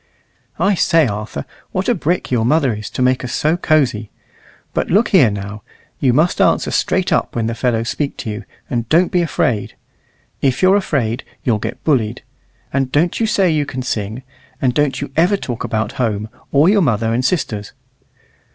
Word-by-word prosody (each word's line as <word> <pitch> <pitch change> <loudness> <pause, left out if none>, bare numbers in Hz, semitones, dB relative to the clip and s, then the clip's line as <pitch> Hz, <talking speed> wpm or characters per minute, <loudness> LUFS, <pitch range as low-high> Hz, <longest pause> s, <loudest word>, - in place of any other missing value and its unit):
"I 195 +4 +2
say, 165 -3 +3
Arthur, 105 - -4 0.3
what 185 - -1
a 245 - +4
brick 175 - -1
your 120 -3 +2
mother 135 0 +2
is 105 0 -6
to 130 - -2
make 130 +1 +2
us 125 - -4
so 155 +1 +2
cozy! 135 -11 +1 0.6
But - - -1
look 210 +5 +3
here 155 - +5
now; 100 +1 -6 0.4
you 130 - +3
must 155 +8 +2
answer - - +2
straight - - +1
up - - 0
when 115 -2 0
the 115 - -1
fellows 115 -1 0
speak 145 -2 -2
to 110 - -4
you, 105 +2 -6 0.2
and 115 -2 -3
don't 175 +3 +3
be 180 - +2
afraid. 125 -9 -1 0.7
If 135 +4 +1
you're 185 +1 +6
afraid, 135 - 0 0.2
you'll 115 -4 +1
get - - -5
bullied. 120 -8 0 0.5
And 135 -1 0
don't 165 +5 +1
you 225 - +1
say 190 -4 +2
you 150 -2 0
can 130 -2 -4
sing; 110 0 -3 0.4
and 125 -2 +1
don't 145 0 0
you 140 - -5
ever 180 +5 +3
talk 120 -10 -5
about 110 -1 -1
home, 110 -2 -1 0.2
or 145 +4 +4
your 205 +1 +4
mother 115 - +1
and 125 +2 0
sisters." 115 - -1
130 Hz, 190 wpm, -18 LUFS, 115-160 Hz, 0.7 s, you're